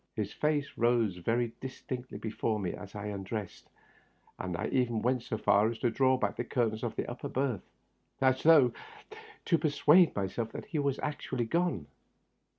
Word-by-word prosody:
His 105 Hz, -2 st, -3 dB
face 150 Hz, -2 st, 0 dB
rose 115 Hz, -5 st, +2 dB
very 115 Hz, +6 st, 0 dB
distinctly 130 Hz, -3 st, -6 dB
before 110 Hz, 0 st, -2 dB
me 95 Hz, -3 st, -2 dB
as 100 Hz, +1 st, -10 dB
I 105 Hz, 0 st, -5 dB
undressed, 100 Hz, 0 st, -5 dB, 0.7 s
and 90 Hz, -2 st, -3 dB
I 105 Hz, -, -2 dB
even 120 Hz, -4 st, +1 dB
went 125 Hz, 0 st, +1 dB
so 110 Hz, -, -4 dB
far 105 Hz, +1 st, +4 dB
as 115 Hz, -, -4 dB
to 120 Hz, -, 0 dB
draw 130 Hz, +2 st, +3 dB
back -, -, -1 dB
the -, -, -1 dB
curtains 115 Hz, -3 st, -1 dB
of 120 Hz, -, -3 dB
the -, -, -2 dB
upper 120 Hz, -, -5 dB
berth, 130 Hz, -6 st, -1 dB, 0.6 s
as 130 Hz, -1 st, +3 dB
though 150 Hz, -7 st, +6 dB, 0.7 s
to 165 Hz, -3 st, +3 dB
persuade 155 Hz, +3 st, +5 dB
myself 105 Hz, +3 st, -2 dB
that -, -, -6 dB
he 155 Hz, -, -3 dB
was 140 Hz, -2 st, 0 dB
actu 150 Hz, -2 st, -3 dB
ally 120 Hz, -2 st, 0 dB
gone. 165 Hz, -, 0 dB
120 Hz, 175 wpm, -31 LUFS, 105-135 Hz, 0.7 s, though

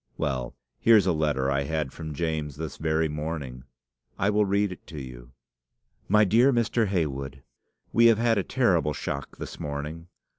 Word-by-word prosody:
Well, 65 Hz, -3 st, -2 dB, 0.2 s
here's 110 Hz, -4 st, +5 dB
a 95 Hz, -, +3 dB
letter 75 Hz, -4 st, 0 dB
I 70 Hz, 0 st, +1 dB
had 75 Hz, -2 st, -2 dB
from 80 Hz, -2 st, -7 dB
James 80 Hz, -3 st, -2 dB
this 80 Hz, +1 st, -6 dB
very 80 Hz, 0 st, +1 dB
morning. 75 Hz, -4 st, -5 dB, 0.5 s
I 100 Hz, +2 st, +2 dB
will 105 Hz, 0 st, +3 dB
read 100 Hz, 0 st, +1 dB
it 90 Hz, -, -11 dB
to 75 Hz, -, -7 dB
you. -, -, -10 dB, 0.8 s
"'MY 105 Hz, +2 st, +5 dB
DEAR 120 Hz, +7 st, +5 dB
MR. 115 Hz, -2 st, +1 dB
HEYWOOD, 70 Hz, -7 st, -2 dB, 0.5 s
We 115 Hz, 0 st, +6 dB
have 115 Hz, -2 st, +5 dB
had 115 Hz, -2 st, +2 dB
a -, -, 0 dB
terrible 90 Hz, -, +1 dB
\shock 70 Hz, 0 st, -5 dB
this -, -, -8 dB
morning. 75 Hz, +3 st, -5 dB
80 Hz, 170 wpm, -26 LUFS, 70-100 Hz, 0.8 s, We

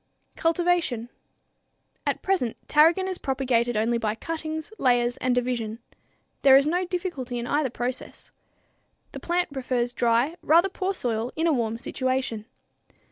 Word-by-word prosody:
Cultivation. 330 Hz, -8 st, 0 dB, 1.0 s
At -, -, -1 dB
present 365 Hz, -, 0 dB
tarragon 330 Hz, +5 st, +4 dB
is 375 Hz, -1 st, -4 dB
propagated 245 Hz, -3 st, 0 dB
only 230 Hz, +2 st, +1 dB
by 215 Hz, -1 st, -1 dB
cuttings, 315 Hz, -, -5 dB
layers 245 Hz, -1 st, +2 dB
and 255 Hz, -1 st, 0 dB
division. 240 Hz, -3 st, -1 dB, 0.6 s
There 270 Hz, -1 st, +8 dB
is 275 Hz, -, +3 dB
no 355 Hz, +4 st, +1 dB
difficulty 345 Hz, -9 st, -3 dB
in 235 Hz, -, -3 dB
either 290 Hz, +1 st, +1 dB
process. 245 Hz, +1 st, -5 dB, 0.8 s
The -, -, -7 dB
plant 350 Hz, -3 st, -1 dB
prefers 250 Hz, -2 st, -1 dB
dry, 240 Hz, +8 st, +1 dB
rather 340 Hz, +5 st, +4 dB
poor 385 Hz, 0 st, -2 dB
soil, 235 Hz, -4 st, -2 dB
in 320 Hz, -, 0 dB
a 330 Hz, -, +3 dB
warm 230 Hz, -3 st, -1 dB
situation. 255 Hz, -3 st, -2 dB
260 Hz, 135 wpm, -25 LUFS, 240-330 Hz, 1.0 s, There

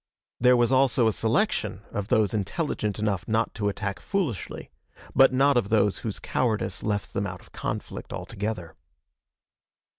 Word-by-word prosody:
There 125 Hz, +1 st, +6 dB
was 120 Hz, +1 st, +3 dB
also 130 Hz, -3 st, +4 dB
a 110 Hz, -, +2 dB
selection 115 Hz, -, 0 dB
of 100 Hz, -1 st, -3 dB
those 110 Hz, -3 st, +2 dB
intelligent 105 Hz, -, -2 dB
enough 105 Hz, -3 st, -1 dB
not 110 Hz, 0 st, +1 dB
to 105 Hz, -2 st, -1 dB
attack 100 Hz, -1 st, -3 dB
foolishly, 170 Hz, -, -3 dB, 0.4 s
but 135 Hz, +1 st, +6 dB
not 135 Hz, +1 st, +4 dB
of 105 Hz, -5 st, +1 dB
those 105 Hz, -2 st, +2 dB
whose 110 Hz, -3 st, -4 dB
cowardice 115 Hz, -4 st, -1 dB
left 105 Hz, -1 st, -2 dB
them 100 Hz, -, -1 dB
out 90 Hz, -1 st, -7 dB
of -, -, -20 dB
conflict -, -, -5 dB
altogether. 100 Hz, -5 st, -4 dB
110 Hz, 150 wpm, -26 LUFS, 100-125 Hz, 0.4 s, There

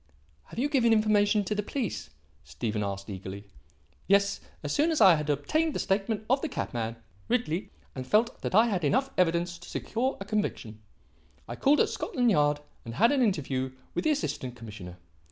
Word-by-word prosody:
"Have -, -, -13 dB
you 260 Hz, +5 st, +1 dB
given 250 Hz, -6 st, +3 dB
information 210 Hz, -1 st, +3 dB
to 200 Hz, -, -2 dB
the 210 Hz, -, 0 dB
police?" 230 Hz, +1 st, -4 dB, 0.3 s
Stephen 105 Hz, -, -3 dB
asked 100 Hz, -1 st, -4 dB
eagerly. 95 Hz, 0 st, -7 dB, 0.6 s
"Yes. 200 Hz, +1 st, +3 dB, 0.2 s
As 145 Hz, -, -2 dB
soon 305 Hz, +3 st, +3 dB
as 320 Hz, -3 st, +1 dB
I 185 Hz, -, +8 dB
had 150 Hz, -2 st, -1 dB
obtained 305 Hz, -, 0 dB
the -, -, -1 dB
statement 205 Hz, +2 st, -1 dB
of 265 Hz, +3 st, +2 dB
the 320 Hz, -, -2 dB
cabman, 115 Hz, -, -3 dB, 0.3 s
Ridley, 225 Hz, -7 st, -1 dB, 0.2 s
and 130 Hz, -1 st, -6 dB
felt 225 Hz, +3 st, +2 dB
that -, -, -2 dB
I 220 Hz, +3 st, +7 dB
had 195 Hz, -7 st, -1 dB
enough 265 Hz, -, +2 dB
evidence 175 Hz, 0 st, +1 dB
to 175 Hz, -, -12 dB
secure 255 Hz, +4 st, -2 dB
a 195 Hz, -, -6 dB
conviction, 130 Hz, -, -3 dB, 0.7 s
I 120 Hz, -, -5 dB
called 285 Hz, -, +4 dB
at -, -, +2 dB
Scotland 245 Hz, -3 st, 0 dB
Yard 145 Hz, -4 st, +2 dB, 0.2 s
and 115 Hz, 0 st, -7 dB
had 230 Hz, +6 st, +4 dB
an 280 Hz, -2 st, +2 dB
interview 135 Hz, -, 0 dB, 0.2 s
with -, -, -1 dB
the 315 Hz, -, +2 dB
Assistant 130 Hz, -, -2 dB
Commissioner. 105 Hz, -6 st, -9 dB
195 Hz, 185 wpm, -28 LUFS, -, 0.7 s, I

